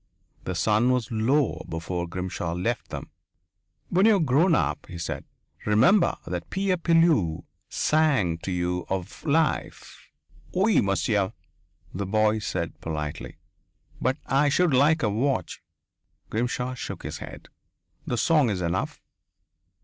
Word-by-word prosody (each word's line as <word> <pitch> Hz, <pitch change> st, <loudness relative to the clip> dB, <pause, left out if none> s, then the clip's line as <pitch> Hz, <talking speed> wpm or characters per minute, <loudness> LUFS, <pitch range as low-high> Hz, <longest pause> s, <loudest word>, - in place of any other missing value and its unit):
The -, -, -3 dB
sun 110 Hz, +3 st, +2 dB
was 125 Hz, -3 st, 0 dB
low 120 Hz, +5 st, +1 dB
before 85 Hz, +2 st, -3 dB
Grimshaw 90 Hz, -1 st, -4 dB
left 110 Hz, +7 st, -2 dB
them. -, -, -7 dB, 0.8 s
"When 190 Hz, +4 st, +4 dB
you 220 Hz, -, +6 dB
are -, -, +2 dB
grown 160 Hz, +4 st, +3 dB
up," -, -, -1 dB
he 85 Hz, -, -8 dB
said, 85 Hz, -, -4 dB, 0.4 s
"remember 130 Hz, -, +4 dB
that 85 Hz, 0 st, -5 dB
Pierre 190 Hz, -1 st, 0 dB
Pilleux 165 Hz, -, +3 dB, 0.3 s
sang 140 Hz, -, +2 dB
to 95 Hz, -, -5 dB
you 90 Hz, 0 st, -2 dB
of 95 Hz, -2 st, -4 dB
life." 160 Hz, +1 st, -1 dB, 0.5 s
"Oui, 200 Hz, +3 st, +4 dB
monsieur," 100 Hz, +1 st, 0 dB, 0.6 s
the 100 Hz, +1 st, -3 dB
boy 110 Hz, +1 st, +2 dB
said 85 Hz, -5 st, -4 dB
politely. 75 Hz, -2 st, -5 dB, 0.6 s
"But 130 Hz, +2 st, +1 dB
I 140 Hz, +2 st, +3 dB
should 170 Hz, +1 st, +2 dB
like 150 Hz, +4 st, +4 dB
a 110 Hz, -, +3 dB
watch." 130 Hz, +6 st, -1 dB, 0.7 s
Grimshaw 125 Hz, +2 st, -1 dB
shook 125 Hz, -, -6 dB
his -, -, -5 dB
head. -, -, -10 dB, 0.6 s
"The 120 Hz, -, -1 dB
song 150 Hz, -2 st, +3 dB
is 100 Hz, -3 st, -1 dB
enough." 85 Hz, +2 st, -2 dB
115 Hz, 135 wpm, -26 LUFS, 90-150 Hz, 0.8 s, you